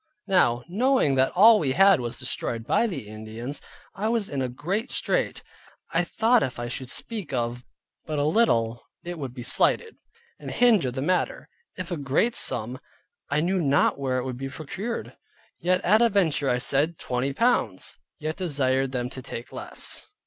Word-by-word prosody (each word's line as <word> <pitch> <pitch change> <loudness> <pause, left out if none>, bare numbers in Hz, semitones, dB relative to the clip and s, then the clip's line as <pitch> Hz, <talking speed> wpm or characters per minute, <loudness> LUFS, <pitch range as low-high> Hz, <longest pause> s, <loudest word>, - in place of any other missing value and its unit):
Now 175 - +3
knowing 230 - +2
that 130 0 +2
all 215 +4 +7
we 135 -4 0
had 195 +2 +6
was 120 -1 -4
destroyed 115 -1 -2
by 235 - +2
the 140 - -5
Indians, 110 +6 -7 0.3
I 205 +3 -2
was 225 -3 -1
in 140 -2 -2
a 130 - -1
great 190 - -3
strait. - - 0 0.5
I - - +3
thought 230 +1 +3
if 125 - -2
I 120 0 -4
should 130 +1 -5
speak 210 - -5
of 120 -1 -2 0.4
but 155 -1 -2
a 145 - +1
little 120 - +2 0.2
it 175 -1 -6
would 135 -4 -4
be 125 - -6
slighted, 450 - +1 0.4
and - - -7
hinder 220 - +3
the 130 +2 -4
matter; 180 +3 -1 0.3
if 185 0 -6
of 170 - -2
a - - -6
great 150 - +1
sum, 125 +4 +1 0.5
I 145 +1 +1
knew 185 +3 +1
not 140 -2 +2
where 130 -2 -1
it 125 - -1
would 130 -2 -4
be 135 +1 -5
procured. 190 - -5 0.4
Yet 180 +1 +1
at 215 +5 +4
a 235 - +5
venture 165 -9 +1
I 125 - +2
said 145 +6 +1
"Twenty 125 +2 -2
pounds," 135 - 0 0.2
yet 155 +1 -4
desired 135 -6 0
them 125 -1 -1
to 130 - -7
take 120 -1 -8
less. - - -2
145 Hz, 185 wpm, -25 LUFS, 125-195 Hz, 0.5 s, all